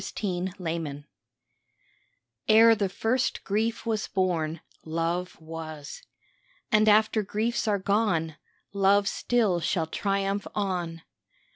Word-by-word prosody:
LOVE - - -7
TRIUMPHANT 175 -6 -3 1.4
Ere 225 +1 +7
the 205 -3 0
first 235 +6 -1
grief 220 +4 -1
was 220 -3 -1
born 170 -5 -1 0.2
Love 165 +3 -2
was. 160 - -8 0.7
And 215 0 +5
after 215 +1 +4
griefs 220 +4 -1
are 205 -1 +2
gone 190 -6 0 0.4
Love 200 0 +3
still 215 -8 +1
shall 165 0 0
triumph 195 +3 -1
on. 175 -5 -2
195 Hz, 105 wpm, -27 LUFS, 165-215 Hz, 1.4 s, Ere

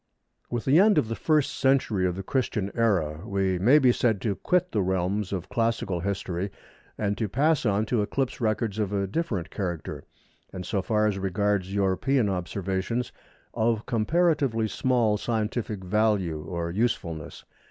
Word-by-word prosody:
With 120 -2 -3
the 140 +5 +5
end 210 +1 +5
of 110 - +2
the 115 - -2
first 155 0 +1
century 125 -8 +2
of 90 - -2
the 95 - -5
Christian 105 -4 -1
Era 90 -10 +1
we 95 -3 0
may 125 +11 +6
be 130 -4 +5
said 115 -4 +1
to 105 - 0
quit 180 - 0
the 105 - +1
realms 95 +2 -1
of 95 -2 -3
classical 115 -6 -1
history 95 0 -2 0.5
and 105 -1 0
to 110 -3 -1
pass 145 - +2
on 105 +1 +1
to 115 0 +1
eclipse 130 +5 -2
records 110 -1 0
of 105 -2 -1
a 100 -1 0
different 100 - -3
character, 85 -5 -4 0.5
and, 90 -1 -6
so 100 -3 -1
far 105 +2 +1
as 100 -2 0
regards 100 0 0
European 100 +5 +1
observations, 95 +5 -2 0.4
of 115 -1 0
comparatively 135 -1 +1
small 115 -2 +1
scientific 110 -2 -2
value 95 -6 0
or 85 -1 -3
usefulness. 85 -7 -2
105 Hz, 160 wpm, -26 LUFS, 95-120 Hz, 0.5 s, may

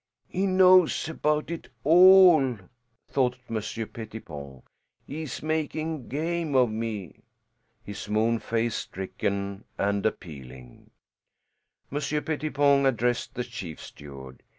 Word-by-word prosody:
"He 195 +2 -1
knows 185 -3 +5
about 150 0 -1
it 170 - -6
all," 175 - +7 0.5
thought 125 -2 0
Monsieur 115 0 -4
Pettipon. 75 - -9 0.4
"He 150 +3 -6
is 155 -2 -6
making 155 -2 -2
game 160 +1 -2
of 125 -3 +4
me." 110 -6 -5 0.6
His 105 0 -8
moon 110 +2 +1
face 115 0 -1
stricken 100 +1 -4
and 100 0 0
appealing, 65 - -6 1.0
Monsieur 150 +1 -1
Pettipon 145 -3 +2
addressed 120 -1 -1
the 125 - -2
chief 95 -10 -8
steward. 65 -3 -11
120 Hz, 105 wpm, -26 LUFS, 100-155 Hz, 1.0 s, all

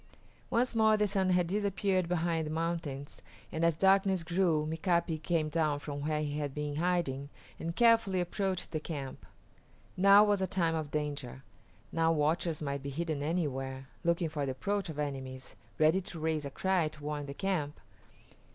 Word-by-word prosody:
Once 245 +2 +2
more 220 -1 +5
the 210 0 +2
sun 190 -2 +1
had 180 -1 +3
disappeared 195 -1 0
behind 165 -2 0
the - - -4
mountains, 160 -4 -3 0.3
and 160 - -2
as 165 -1 +4
darkness 190 -1 +4
grew 170 -2 +1
Mika´pi 165 0 0
came 165 -2 0
down 155 -2 +1
from 145 0 -5
where 150 +1 0
he 145 0 -2
had 145 -2 -3
been 150 -1 -3
hiding 160 -6 0 0.3
and 165 +1 -4
carefully 230 -5 +4
approached 185 +1 -2
the 155 - -1
camp. 145 -4 -6 0.7
Now 200 +2 +7
was 205 -2 +2
a 190 - +1
time 170 -3 +1
of 155 -2 -2
danger. 145 -3 -4 0.5
Now 165 0 +2
watchers 160 +1 0
might 140 -1 -2
be 140 - -5
hidden 155 0 -2
anywhere, 135 -5 -2
looking 170 0 +1
for 150 -2 -3
the 135 -1 -1
approach 200 +7 -2
of 155 - -6
enemies, 135 -3 -5 0.2
ready 160 +5 +4
to 175 -2 -8
raise 155 -1 -1
a - - -3
cry 185 +2 +1
to 150 -1 -10
warn 145 -1 -3
the 140 - -6
camp. 175 -7 -2
160 Hz, 175 wpm, -31 LUFS, 145-185 Hz, 0.7 s, Now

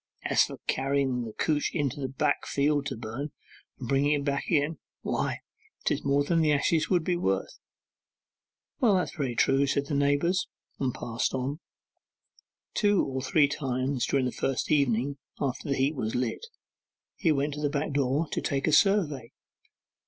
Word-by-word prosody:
As - - +4
to - - -8
carrying 135 -2 0
the 110 - -7
couch 150 +3 0
into 145 -3 -1
the 135 - -2
back 135 +1 0
field 145 0 +1
to 135 - -4
burn, 120 +6 -5 0.5
and 125 - -6
bringing 140 +3 +3
it 145 -1 0
back 140 -1 -1
again, 155 -1 +1 0.2
why, - - -2 0.4
'tis - - 0
more 140 +1 +2
than 165 +3 +2
the 155 -1 +3
ashes 155 +2 +2
would 180 -3 +2
be 180 +2 +1
worth.' 95 - -1 1.2
'Well, 220 -6 +4
that's 180 - -1
very 135 -6 -2
true,' 135 +3 +3
said 140 +1 0
the 145 - -4
neighbours, 145 +6 +2 0.3
and 130 -2 0
passed 115 +2 -2
on. 135 +4 -2 1.1
Two 205 -2 +3
or 130 -1 -3
three 145 +2 +3
times 130 -2 -1
during 135 -2 +1
the 125 - -1
first 135 -2 -2
evening 140 -1 +2 0.2
after 140 0 -2
the 140 - +1
heap 135 +3 +2
was 110 -6 -3
lit, 125 - -2 0.7
he 165 - +2
went 145 0 0
to 150 - -6
the 145 - +1
back 145 +1 -2
door 140 +3 +1
to - - -1
take 140 -1 -1
a - - +2
survey. 150 - +3
140 Hz, 175 wpm, -28 LUFS, 130-150 Hz, 1.2 s, As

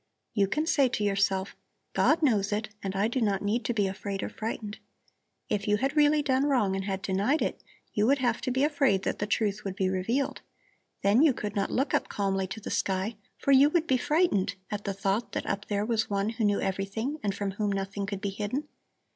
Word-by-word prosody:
You 200 -4 +3
can 305 +10 0
say 280 -5 +3
to 215 - -2
yourself: 195 -1 +1 0.4
'God 320 +1 +3
knows 210 -8 +2
it, 215 +1 -1
and 195 -1 -4
I 200 +2 +2
do 245 +2 -1
not 200 -3 +1
need 215 +4 0
to 240 - 0
be 205 -2 +2
afraid 195 0 -4
or - - -3
frightened.' 215 -1 -5 0.7
If 205 0 -1
you 210 0 +3
had 270 +6 -1
really 300 0 +4
done 270 0 +2
wrong 225 -9 +2
and 195 0 -3
had 195 -1 -3
denied 200 +11 +1
it, - - -3 0.3
you 210 +1 +2
would 280 +2 +4
have 245 -3 0
to 260 - -2
be 260 +2 +1
afraid 275 -10 +2
that - - -2
the 210 - -1
truth 210 -1 0
would 195 -2 -4
be 190 -2 +1
revealed. 230 +9 -1 0.6
Then 205 +6 +5
you 305 -3 +6
could 210 -3 -5
not 200 -1 0
look 270 +3 0
up - - +1
calmly 195 -1 -1
to 220 - -6
the 210 - -6
sky, 195 +3 -1 0.2
for 280 - 0
you 275 +2 +7
would 335 0 +1
be 260 -5 +2
frightened 245 - +1 0.2
at 205 -1 -4
the 200 - -1
thought 195 +3 -1
that - - -2
up 200 +1 -3
there 205 0 0
was 225 -1 0
One 200 +1 0
who 225 -1 -1
knew 205 -1 +2
everything 200 +9 -2
and 200 -2 -1
from 200 -1 -2
whom 205 +1 -1
nothing 195 0 -3
could 200 -1 -4
be 200 - -2
hidden. 215 +9 -3
210 Hz, 230 wpm, -28 LUFS, 195-255 Hz, 0.7 s, you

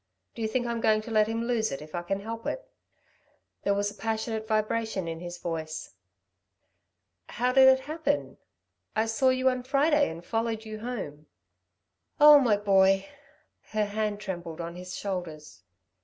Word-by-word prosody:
do 230 - -8
you 220 - +1
think 245 +2 -1
I'm 235 -1 -2
going 215 -1 +3
to 230 - -9
let 215 -1 +4
him 225 +1 -2
lose 235 -2 0
it, 135 - -4
if 155 +1 -12
I 175 - -2
can 195 +3 -3
help 225 +2 -6
it." - - -4 0.9
There 200 - +1
was 205 0 0
a - - -12
passionate 220 0 -3
vibration 215 -3 -1
in 165 0 -4
his 175 0 -7
voice. 160 -2 -5 1.4
"How 250 +3 0
did 265 0 +8
it 265 0 +6
happen? 295 0 -2 0.6
I 220 - +2
saw 225 +4 +2
you 255 0 +1
on 255 0 -3
Friday 285 +3 +2
and 165 +2 -9
followed 225 -1 -2
you 215 0 -7
home." 190 -11 -6 0.9
"Oh, 295 0 +10
my 230 -6 +3
boy!" 195 -1 +3 0.6
Her 215 -1 +2
hand 210 0 -2
trembled 175 -5 -6
on 170 0 -5
his 180 0 -7
shoulders. 175 - -6
215 Hz, 170 wpm, -28 LUFS, 185-235 Hz, 1.4 s, Oh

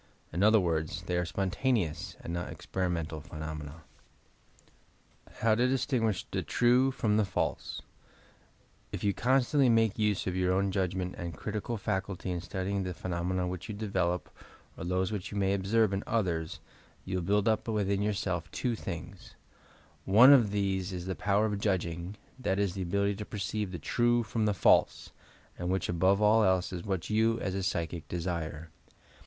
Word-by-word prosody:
In 85 - -1
other 110 +1 +6
words, 85 -2 -1
they 90 +1 -2
are 90 0 +1
"spontaneous" 95 - -1
and 85 - -5
not 85 0 -3
"experimental" 85 -4 -3
phenomena. 75 0 -7 1.6
HOW 110 -1 +4
TO 120 +3 +3
DISTINQinSH 125 -6 0
THE - - -1
TBUE 125 +2 +3
FROM 105 -5 +1
THE 110 - +4
FALSE 100 -1 -3 1.1
If - - -5
you 100 -1 +2
constantly 130 +3 +3
make 115 -2 +3
use 105 -2 +1
of 90 - -1
yout 90 0 +1
own 95 +1 +1
judgment 95 -1 -1
and 85 -1 -5
critical 110 +2 -3
faculty 95 -1 -3
in 90 -1 -2
studying 95 +2 -2
the 90 -2 -4
phenomena 90 +1 -2
which 90 +3 -5
you 105 - -4
develop 95 -4 -1 0.4
or - - -7
those 90 +2 0
which 100 -4 -4
you 100 - -4
may 95 -1 +2
observe 100 +2 +2
in 95 - -1
others, 85 -8 -1 0.4
you 95 0 -2
will - - -1
build 105 +4 +2
up 110 0 +1
within 100 -3 0
yourself 95 -6 -1
two 120 +8 -1
things: 90 -5 -8 0.7
One 120 +8 +8
ol 135 - +8
these 100 -3 -1
is 90 -1 -5
the 95 - -2
power 105 +2 +1
of 105 -2 -1
judging, 90 -2 -2 0.2
that 95 -7 0
is 100 -3 +1
the 95 - -4
ability 100 +3 0
to 105 - -5
per 105 - -7
ceive 100 0 -2
the 90 - -4
true 120 - +2
from 110 0 -1
the 105 - +1
false, - - +3 0.5
and 90 0 -2
which, 95 +1 0
above 95 +4 +3
ail 105 +2 +5
else, 95 -3 +2
ia 90 - -3
what 95 0 -3
you, 115 +1 +2
as 95 - -2
a 95 - -2
psychic, 85 -3 -2
desire. 85 -2 -4
95 Hz, 175 wpm, -30 LUFS, 90-105 Hz, 1.6 s, One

